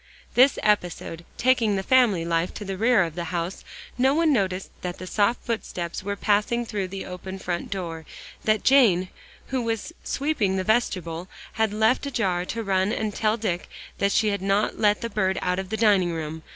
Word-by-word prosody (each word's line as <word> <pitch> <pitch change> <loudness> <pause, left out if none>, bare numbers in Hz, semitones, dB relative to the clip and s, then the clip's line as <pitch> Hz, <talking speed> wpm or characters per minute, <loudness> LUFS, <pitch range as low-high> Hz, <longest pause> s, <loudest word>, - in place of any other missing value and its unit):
This 260 +3 +5
episode 175 -4 0
taking 240 -4 +3
the 195 - -1
family 220 -9 +3
life 170 +1 0
to 210 - -6
the 195 0 -3
rear 225 0 +4
of 165 -2 -4
the 175 +1 -4
house, 170 +2 -3 0.4
no 265 +2 +4
one 325 -2 +3
noticed 190 -5 -1
that 180 -1 -4
soft 210 +5 +1
footsteps 180 -7 -3
were 200 +1 -3
passing 210 +4 +1
through 205 -4 -3
the 195 +1 -6
open 190 +1 -7
front 175 -2 -4
door, 165 -5 -5 0.4
that 215 0 +2
Jane, 210 -10 +5 0.4
who 260 -1 0
was 230 +6 -3
sweeping 270 -10 0
the 190 - 0
vestibule, 185 -6 0 0.3
had 220 -1 +1
left 220 +6 +2
ajar 190 -9 0
to 230 +4 -4
run 190 0 +1
and 215 -2 -2
tell 215 +1 +1
Dick 185 -6 -3 0.3
that 200 0 +2
she 215 +1 +3
had 200 -1 -2
not 195 +2 0
let 210 -1 +3
the 235 - -2
bird 190 -2 0
out 180 +1 -1
of 190 -1 -5
the 220 - -2
dining 200 -6 +3
room. 160 -1 -5
200 Hz, 190 wpm, -25 LUFS, 180-225 Hz, 0.4 s, This